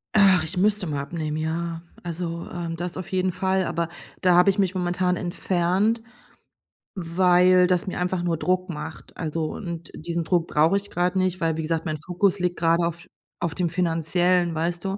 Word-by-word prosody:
Ach, 190 -5 +6
ich 160 +3 -4
müsste 205 -1 +2
mal 145 -2 -2
abnehmen, 155 0 -4
ja, 165 +1 -2 0.2
also, 170 0 -4
ähm, 170 -1 -4
das 175 +2 -4
auf 185 - -7
jeden 185 0 +1
Fall, 190 0 0
aber 170 0 -2 0.3
da 180 -1 +4
habe 180 +2 +6
ich 195 - +1
mich 190 -2 +2
momentan 180 0 0
entfernt, 185 +5 0 0.9
weil 180 +1 +4
das 180 +2 +1
mir - - -3
einfach 180 0 -1
nur 170 -1 +1
Druck 185 +2 0
macht, 155 0 -7
also, 160 -1 -3
und 170 -4 -6
diesen 170 +1 -3
Druck 175 -1 +1
brauche 160 +5 +3
ich 200 0 -2
grad 180 +2 0
nicht, 185 -1 +1
weil, 165 -1 +1
wie 160 - -2
gesagt, 160 +1 -2
mein 155 -2 -2
Fokus 185 +2 +1
liegt 180 -1 -1
grade 170 0 +3
auf 170 0 -4 0.4
auf 165 -2 -2
dem 175 -2 0
Finanziellen, 175 +1 +1
weißt 170 +2 -2
du? 195 +1 -2
175 Hz, 190 wpm, -24 LUFS, 165-185 Hz, 0.9 s, Ach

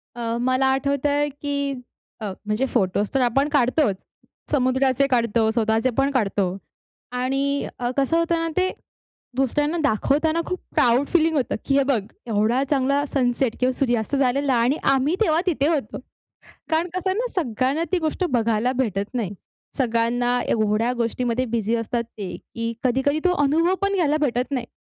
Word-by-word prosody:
अ, 235 -1 -2
मला 255 +1 +2
आठवतंय 285 +2 0
की 280 0 -3 0.5
अ, - - -3 0.2
म्हणजे 215 +5 0
फोटोच 195 +2 +1
तर 270 - +2
आपण 270 +4 +2
काढतोच. 255 -5 +2 0.6
समुद्राचे 265 0 +2
काढतो, 230 -3 +2
स्वतःचे 225 +1 +1
पण 275 +1 +2
काढतो 205 -6 +1 0.8
आणि 275 +2 0
अ, 245 -1 -1
कसं 275 +4 +2
होतं 335 0 +1
ना, - - -1
ते 370 0 +3 0.7
दुसऱ्यांना 290 +5 0
दाखवताना 295 +6 +1
खूप 365 - -3 0.2
प्राउड 245 +4 +3
फीलिंग 325 -2 +2
होतं, 265 - 0
की 275 - +2
हे 275 - +4
बघ, 265 -5 +1 0.3
एवढा 225 +4 +1
चांगला 280 0 +2
सनसेट 245 -2 +1
किंवा 255 0 +2
सूर्यास्त 240 -1 0
झालेला 275 +1 +1
आणि 240 +5 +2 0.2
आम्ही 275 +6 +1
तेव्हा 320 -5 +3
तिथे 295 -5 +1
होतो. 295 -9 -1 0.7
कारण 325 +2 +1
कसंय 375 0 0
ना - - 0
सगळ्यांना 270 - 0
ती 370 - +3
गोष्ट 320 +3 -1
बघायला 230 0 +1
भेटत 200 0 -3
नाही. 225 -7 -1 0.5
सगळ्यांना 245 0 +1
एवढ्या 215 +2 +1
गोष्टीमध्ये 240 +1 -1
बिझी 225 0 0
असतात 235 +1 -2
ते, 205 -5 -7
की 230 0 -5
कधी-कधी 265 +4 +1
तो 360 - +4
अनुभव 330 +6 +2
पण 400 0 +1
घ्यायला 305 -5 +2
भेटत 250 -2 0
नाही. 255 -4 -2
260 Hz, 155 wpm, -23 LUFS, 235-285 Hz, 0.8 s, हे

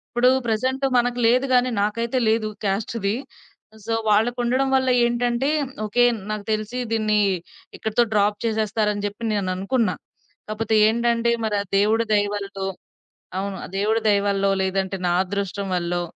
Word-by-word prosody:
ఇప్పుడు 245 +1 +4 0.2
ప్రెజెంట్ 255 +5 0
మనకు 245 0 0
లేదు 250 +3 +3
గానీ, 250 0 +3
నాకైతే 230 +4 -1
లేదు. 220 0 +1 0.2
క్యాస్ట్‌ది. 200 +1 -1 0.7
సో 225 +1 -1 0.2
వాళ్ళకు 225 +4 +2
ఉండడం 260 +3 +1
వల్ల 260 0 +1 0.2
ఏంటంటే, 240 +2 0 0.4
ఓకే. 230 +3 +2 0.3
నాకు 215 -1 -4
తెలిసి 215 +3 -3
దీన్ని 215 -1 +2 0.6
ఇక్కడితో 220 +2 +1
డ్రాప్ 210 0 +2
చేసేస్తారని 215 -2 0
జెప్పి 205 +3 -4
నేననుకున్నా. 200 +4 0 0.5
కాపోతే 220 +1 -1
ఏంటంటే 235 +1 +1
మరి 215 -1 0
ఆ - - -10
దేవుడి 215 +3 +3
దయవల్లో 200 -1 -1 0.7
అవును. 195 0 -3
ఆ - - -6
దేవుడి 215 +3 +1
దయవల్లో, 200 -1 +2
లేదంటే 190 0 -1
నా 175 - +2
అదృష్టం 200 +1 -3
వల్లో 175 0 -1
215 Hz, 135 wpm, -23 LUFS, 200-235 Hz, 0.7 s, ఇప్పుడు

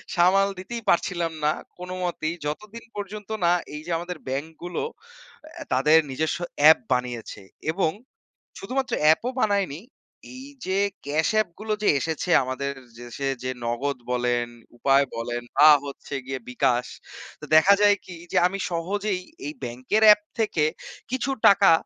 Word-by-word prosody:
সামাল 190 +3 +4
দিতেই 235 +5 -6
পারছিলাম 170 -1 +1
না 150 - +4 0.3
কোনোমতেই, 180 -2 -3
যতদিন 210 +10 -5
পর্যন্ত 205 0 -7 0.2
না 170 - +5 0.2
এই 150 - -6
যে, - - -3
আমাদের 175 +1 -6
ব্যাংক 135 +4 -2 0.2
গুলো 175 0 -3 0.9
তাদের 150 +5 +5
নিজস্ব 160 +5 -1 0.3
app 160 - +7
বানিয়েছে 125 -4 -4 0.3
এবং 160 -2 +1 0.7
শুধুমাত্র 260 +6 -2 0.2
app - - +2
ও - - -1
বানায়নি, 200 -7 0 0.5
এই 260 +1 -9 0.2
যে, 190 +1 0 0.3
cash 155 +5 +1
app 195 - -5
গুলো 215 0 -2
যে, - - +4
এসেছে 160 +4 -3
আমাদের 135 +2 -3 0.3
দেশে 120 +3 -5 0.2
যে, 130 - -1
নগদ 125 +4 -1
বলেন, 120 -1 0 0.3
উপায় 135 +2 +4
বলেন 120 +1 -3 0.2
বা 155 - +9 0.2
হচ্ছে 140 0 -8
গিয়ে 130 0 -4
বিকাশ। 125 0 +1 0.5
তো - - -7
দেখা 185 +6 +7
যায় 205 0 +6
কি 180 - -9 0.2
যে, - - +1
আমি 195 +2 -5
সহজেই 190 +3 -2 0.3
এই 150 - -4
ব্যাংকের 130 - -1
অ্যাপ 210 0 +8 0.2
থেকে 210 -8 +1 0.5
কিছু 260 +1 -1 0.2
টাকা 200 -2 +6
165 Hz, 145 wpm, -25 LUFS, 135-195 Hz, 0.9 s, বা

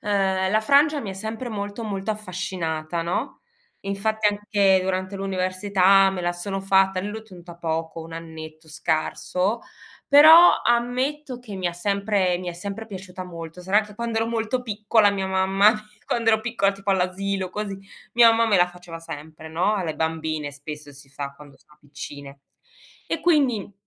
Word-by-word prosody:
ehm, 190 -2 +1
la 215 +2 +3
frangia 285 +6 +4
mi 210 - -5
è - - -5
sempre 220 +5 -5
molto, 205 +1 -5
molto 195 -1 -3
affascinata 180 -5 -3
no? 170 +2 -3 0.4
Infatti 215 +2 0
anche 205 -2 +2
durante 185 +1 -2
l'università 195 0 +3
me 190 -1 -4
la 175 0 0
sono 195 +3 -4
fatta 195 -1 +3
e - - -2
lì 200 - -4
l'ho 220 +1 -6
tenuta 180 -5 -13
poco, 165 0 -3
1 165 0 -10
annetto 160 -1 -10
scarso, 180 +7 -1 0.5
però 315 +5 +8
ammetto 250 +3 0
che 235 -5 -10
mi 185 -2 -1
ha - - -5
sempre 200 0 0
mi 180 0 -6
è - - -3
sempre 200 +5 -6
piaciuta 185 -3 -8
molto, 170 -1 -9
sarà 200 +4 +3
che 210 -1 -13
quando 230 0 -2
ero 225 - 0
molto 230 +2 -1
piccola 215 -1 +2
mia 195 -1 -2
mamma 190 +2 +4 0.3
quando 230 -1 +1
ero 220 0 +3
piccola 220 -4 0
tipo 195 0 -4
all'asilo, 190 +1 -1
così, 200 -1 -4 0.4
mia 235 0 +8
mamma 230 0 +2
me 205 - +4
la 175 - +5
faceva 175 -1 -10
sempre 155 0 -9
no, 175 +6 +1
alle 175 -6 -2
bambine 160 -2 -2
spesso 145 +1 -9
si 140 0 -15
fa 140 0 -6
quando 145 -1 -15
sono 150 0 -26
piccine. 145 -1 -10 0.7
E 330 - -2
quindi 275 - +2
195 Hz, 170 wpm, -24 LUFS, 175-215 Hz, 0.7 s, però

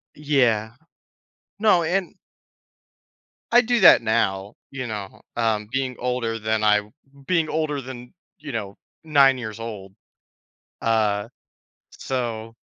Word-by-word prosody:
Yeah. 125 -7 +1 0.9
No, 205 -6 +4
and 180 +3 -1 1.4
I 240 - +7
do 240 -1 +1
that - - +8
now, 105 -3 -1 0.2
you 130 -2 -5
know, 105 -3 -7
um, 110 -3 0
being 130 -1 -2
older 120 -2 -2
than 110 0 -1
I 105 0 +4 0.5
being 165 -4 +1
older 150 -3 -1
than, 125 -1 -10 0.2
you 145 -1 -8
know, 100 -4 -5 0.3
9 140 -4 +4
years 110 -2 -7
old. 100 -4 -7 0.9
Uh, 110 -1 +1 0.6
so 115 -3 -4
120 Hz, 115 wpm, -23 LUFS, 110-140 Hz, 1.4 s, that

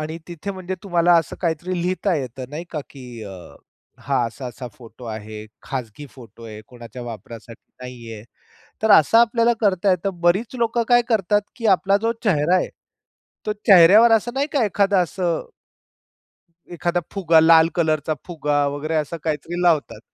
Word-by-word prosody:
आणि 155 +2 -5
तिथे 175 +3 -6
म्हणजे 190 -1 -5
तुम्हाला 175 -2 +3
असं 160 - -4
काहीतरी 175 +2 -2
लिहिता 185 +1 -1
येत. 130 -2 -6
नाही 155 +5 -7
का? 155 - -4
की 125 -4 -11
अ, 95 -3 -11 0.4
हा 135 -2 -1
असा-असा 125 +1 -8
फोटो 120 0 -14
आहे. 110 -1 -8 0.2
खाजगी 130 +1 -6
फोटो 115 -3 -15
आहे. 110 -1 -9
कोणाच्या 120 0 -11
वापरासाठी 115 +1 -11
नाहीये. 115 -4 -9 0.6
तर 220 - +2
असा 160 +9 +6
आपल्याला 235 0 +3
करता 195 -2 +2
येतं. 180 0 -2
बरीच 190 +8 +1
लोकं 235 0 0
काय 240 0 +5
करतात, 210 -2 +1
की 230 -2 -3
आपला 195 +2 +1
जो 230 - +1
चेहरा 170 -3 +2
आहे, - - -1 0.8
तो 210 - 0
चेहऱ्यावर 200 +5 +7
असं 225 +2 +1
नाही 275 +1 0
का 275 -5 +2
एखादं 200 0 +1
असं 175 -1 -3 1.3
एखादा 175 0 -1
फुगा, 170 -5 +3
लाल 160 0 +6
कलरचा 155 -2 0
फुगा 150 -4 -1
वगैरे 155 +3 -3
असं 155 +2 -2
काहीतरी 160 +3 -3
लावतात. 165 -4 +1
165 Hz, 155 wpm, -21 LUFS, 130-195 Hz, 1.3 s, चेहऱ्यावर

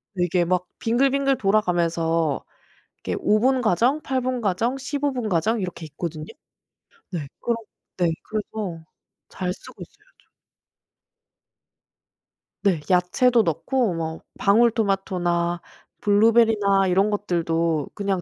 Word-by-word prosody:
이게 175 -1 +1
막 180 +1 0
빙글빙글 270 +3 +2
돌아가면서 170 -6 +1 0.6
이게 - - -4
5 215 - +3
분 260 +2 +3
과정 240 - +2
8 265 -2 -1
분 255 0 -2
과정 225 +5 0
15 280 +2 -2
분 245 -4 -3
과정 210 +5 +1
이렇게 180 -3 -5
있거든요. 155 +1 -6 0.9
네 155 -6 -4
그럼 235 -1 0 0.4
네 180 - +2 0.2
그래서 210 -6 -5 0.4
잘 180 -1 -3
쓰고 - - -12
있어요 - - -15
좀. - - -31 2.4
네 185 -7 +2
야채도 220 +7 +3
넣고 220 - 0
뭐 160 -1 -4 0.2
방울토마토나 195 -6 +1 0.4
블루베리나 210 -2 +4
이런 190 +3 +3
것들도 165 -6 0
그냥 195 -2 -1
195 Hz, 225 characters per minute, -23 LUFS, 175-230 Hz, 2.4 s, 블루베리나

